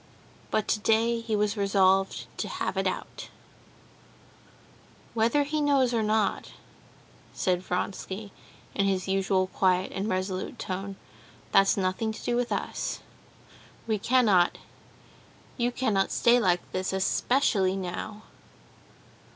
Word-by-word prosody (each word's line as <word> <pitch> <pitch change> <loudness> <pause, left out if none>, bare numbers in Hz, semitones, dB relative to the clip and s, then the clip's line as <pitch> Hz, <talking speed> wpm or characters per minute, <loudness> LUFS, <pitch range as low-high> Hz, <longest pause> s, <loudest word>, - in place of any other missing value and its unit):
But 215 -1 0
today 225 +2 +2
he 225 -1 -2
was 210 0 +1
resolved 195 -1 +2
to - - -2
have - - -3
it - - 0
out. - - -5 1.8
"Whether 235 +6 +2
he 300 +2 -2
knows 275 -4 +3
or 230 - +2
not," 215 -1 0 0.8
said 180 -1 0
Vronsky, 190 +2 -4 0.4
in 200 - +1
his 190 -2 0
usual 190 0 +1
quiet 185 0 +1
and 195 +3 -3
resolute 185 -1 -3
tone, 195 +1 -4 0.6
"that's 195 0 +4
nothing 190 +4 0
to - - -10
do 240 - 0
with 245 0 -1
us. - - -3 0.8
We 220 -2 0
cannot... 210 -7 +3 1.0
you 245 -1 0
cannot 215 -7 +1
stay 240 +1 +4
like 180 -5 +2
this, 185 +1 -2
especially 190 0 +2
now." 195 +3 -5
200 Hz, 120 wpm, -27 LUFS, 190-230 Hz, 1.8 s, that's